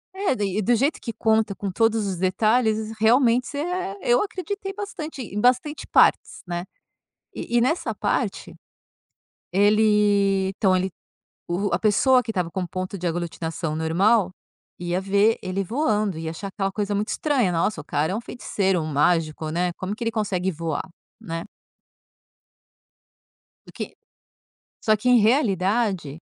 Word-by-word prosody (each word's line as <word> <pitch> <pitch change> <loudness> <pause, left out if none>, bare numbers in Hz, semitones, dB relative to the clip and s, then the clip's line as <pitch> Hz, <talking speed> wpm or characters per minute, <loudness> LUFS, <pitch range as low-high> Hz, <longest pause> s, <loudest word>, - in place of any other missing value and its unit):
É, 380 -9 0
daí 200 -3 -2
e - - +1
do 240 +4 +3
jeito 275 +7 0
que 230 - -4
conta 220 -2 +1
com 195 -1 -4
todos 225 +1 +1
os 190 -2 -3
detalhes, 215 +4 +1
realmente 240 +2 +4
você 285 - -6
é 355 - -3
eu 240 - +3
acreditei 395 -1 -4
bastante 345 -8 -6
em 210 -1 -4
bastante 255 +5 +1
partes - - +3
né. 175 0 -3 0.7
E 240 - -1
e - - +4
nessa 310 +8 0
parte, - - -2 1.0
ele 205 -1 +3
então 190 -1 +2
ele 185 +1 0 0.6
o 190 +4 -1
a 175 - +2
pessoa 225 +6 +4
que 230 - -6
estava 180 -5 -2
com 185 +1 -3
ponto 185 +2 -5
de 180 - -4
aglutinação 165 -1 -3
normal 185 +5 +2 0.5
ia 175 +1 -1
ver 200 +3 +2
ele 185 +2 -2
voando 215 - 0
ia 160 0 -4
achar 195 +4 -6
aquela 195 0 -2
coisa 205 0 -2
muito 210 +1 -1
estranha, 260 - +1
nossa 170 +1 0
o 150 - -10
cara 150 +3 -1
é - - -1
um - - -3
feiticeiro, 195 -6 -1
um 155 - -3
mágico 155 +1 +1
né, 175 +2 0
como 190 +2 -4
que 235 - -10
ele 230 - 0
consegue 195 -4 -1
voar, 165 -1 -3 0.4
né. 165 -6 -5 2.2
Do - - -14
que - - -7 0.9
só 215 -2 +3
que 230 +4 -2
em 250 -1 +7
realidade 200 - +1
205 Hz, 155 wpm, -24 LUFS, 180-230 Hz, 2.2 s, em